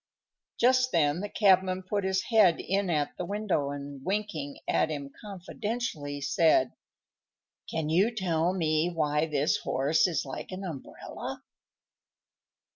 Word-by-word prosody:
Just 255 +1 +4
then 150 0 +2
the 205 +2 -4
cabman 190 -3 +3
put 200 +2 -2
his 190 0 0
head 210 -7 +4
in 195 0 -1
at 150 -3 0
the - - -3
window, 195 -6 -1
and, 140 -1 -7
winking 185 -7 -3
at - - +2
him 140 -3 -5
confidentially, 200 - -4
said, 140 -2 +3 1.0
"Can 160 -2 -2
you 180 +8 +3
tell 180 -6 0
me 160 -2 +1
why 155 -2 0
this 150 -1 +1
horse 145 +6 +2
is 165 -6 -1
like 135 - -7
an 185 +1 -6
umbrella?" 160 -8 -7
170 Hz, 130 wpm, -28 LUFS, 150-195 Hz, 1.0 s, Just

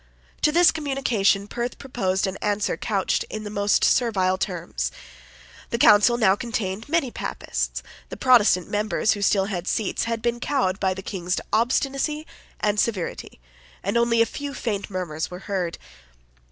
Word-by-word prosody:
To 300 - +4
this 345 +1 +6
communication 250 -10 +1
Perth 240 +2 -4
proposed 195 -8 -1
an 190 - -3
answer 205 0 0
couched 200 -5 0
in 215 - -5
the 205 - -6
most 205 0 +2
servile 195 -7 +3
terms. 60 - -3 0.8
The 235 - -1
Council 230 +1 +6
now 195 -5 +4
contained 220 0 -4
many 310 -6 +1
Papists; - - -3 0.3
the - - -7
Protestant 225 -8 +4
members 210 0 0
who 205 - -1
still 195 -1 +3
had 185 -3 -4
seats 215 0 -1
had 230 -1 -3
been 240 0 0
cowed 240 -9 0
by 190 -1 +1
the 190 - -7
King's 180 -2 -2
obstinacy 275 +6 0 0.3
and 210 0 +1
severity; 195 - -2 0.4
and 200 - -1
only 235 -1 +4
a - - -1
few 285 +4 -6
faint 210 -5 -3
murmurs 175 -5 -3
were 180 +1 -8
heard. 185 -4 -2
210 Hz, 155 wpm, -24 LUFS, 190-240 Hz, 0.8 s, this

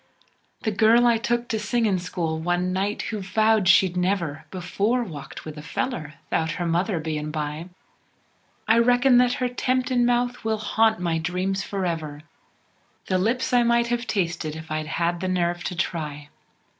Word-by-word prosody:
The 220 - 0
girl 220 +4 +5
I 235 -2 +4
took 240 +1 -1
t' 220 - -1
singin' 210 -2 +1
school 165 -3 -3
one 175 +2 0
night, 200 +3 -1
who 215 - -2
vowed 215 +1 +2
she'd 185 0 +5
never 180 -5 -1
Before 200 +6 -1
walked 155 -10 -9
with 155 -1 -7
a - - -7
feller 155 - -4 0.2
'thout 160 0 0
her 175 - -3
mother 175 +2 0
bein' 155 -1 -3
by, 150 +2 -4 1.0
I 225 +2 +5
reckon 245 +1 +5
that 250 0 +3
her 250 - -1
temptin' 250 0 0
mouth 245 0 +1
will 220 -1 0
haunt 220 +1 +2
my 170 -2 0
dreams 180 +3 -1
forever, 165 -7 -3 0.9
The 185 -1 +2
lips 245 +6 0
I 245 - +5
might 235 0 +2
have 240 +1 -1
tasted 170 -5 -1
if 160 0 -9
I'd 155 0 -2
had 170 +2 -1
the 185 - -2
nerve 175 -1 0
t' 180 - -3
try! 150 -5 -3
185 Hz, 170 wpm, -24 LUFS, 165-230 Hz, 1.0 s, girl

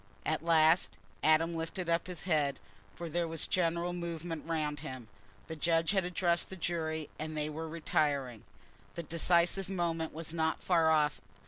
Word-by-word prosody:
At - - 0
last 165 +1 +4 0.2
Adam 160 +2 +3
lifted 165 +3 -4
up 170 +1 +1
his 180 -4 -2
head, 150 -6 +1 0.3
for 170 +8 -7
there 170 +1 -1
was 165 -1 -1
a - - -9
general 170 0 +1
movement 170 -2 -4
round 150 -3 -1
him. 130 -6 -8 0.4
The 160 - -6
judge 165 +2 +2
had 190 -3 +1
addressed 175 -1 +1
the 190 - -6
jury, 160 -3 -2
and 155 0 -4
they 150 0 -1
were 160 +1 -5
retiring. 145 -7 -1 0.5
The 170 - -4
decisive 170 +3 +2
moment 165 -4 -1
was 160 +1 -4
not 160 -1 0
far 165 -3 +3
off. 150 -1 +3
165 Hz, 165 wpm, -32 LUFS, 155-170 Hz, 0.5 s, last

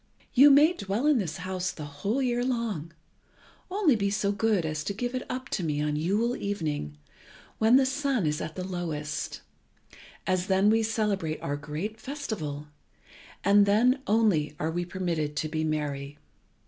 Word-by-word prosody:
You 275 +3 +8
may 295 +5 +6
dwell 205 - -2
in 300 -4 +4
this 180 -5 -3
house 185 0 -3
the 150 - -8
whole 195 - -2
year 245 -1 +1
long, 230 - -2 0.8
only 370 - +3
be 200 -2 0
so 200 0 0
good 205 -3 +1
as 155 -1 -2
to 200 - -2
give 245 +4 -3
it 255 - -2
up 255 +1 -4
to 185 - -2
me 150 -2 -1
on 150 0 0
Yule 205 +10 +1
evening, 150 - -3 0.6
when 225 +3 +5
the 265 0 +6
sun 270 - 0
is 150 0 0
at 155 0 -5
the 185 - -4
lowest, 165 -5 -4 0.8
as 185 0 0
then 195 +2 +4
we 225 +1 +3
celebrate 210 -8 -1
our 145 - -1
great 155 +10 -5
festival, 195 - -5 0.8
and 200 +1 +5
then 245 +6 +3
only 205 -9 +2
are 160 +1 -1
we 175 +1 -2
permitted 170 -5 -2
to 155 - -1
be 155 0 -2
merry. 145 -2 -3
195 Hz, 170 wpm, -28 LUFS, 155-230 Hz, 0.8 s, You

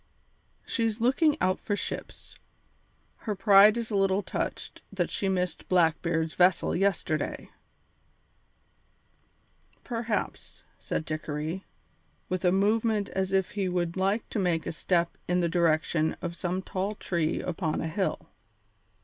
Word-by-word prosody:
"She's 225 -2 -1
looking 270 +6 +3
out 185 0 +1
for 205 - -2
ships; - - -6 0.8
her 210 -3 -3
pride 200 +2 +7
is 230 -1 -3
a - - 0
little 195 0 +2
touched - - -4
that - - -1
she 195 - -1
missed 180 -2 -2
Blackbeard's 165 -2 +2
vessel 180 -1 +3
yesterday." 190 -4 -1 2.3
"Perhaps," 230 -3 -3 0.2
said 155 - -3
Dickory, 155 +3 -4 0.6
with 185 0 -2
a 180 - +4
movement 210 +2 +2
as 190 0 -2
if 190 -1 +1
he 195 -3 -1
would 175 -1 -1
like 195 +4 0
to - - -2
make 175 -4 +1
a - - -2
step 170 +1 0
in 180 0 +2
the 175 - +2
direction 160 -2 +1
of 170 -1 -4
some 180 +1 -2
tall 195 +3 -3
tree 170 -5 -1
upon 165 -3 -2
a 160 - -2
hill. 185 +4 -2
185 Hz, 130 wpm, -28 LUFS, 170-205 Hz, 2.3 s, pride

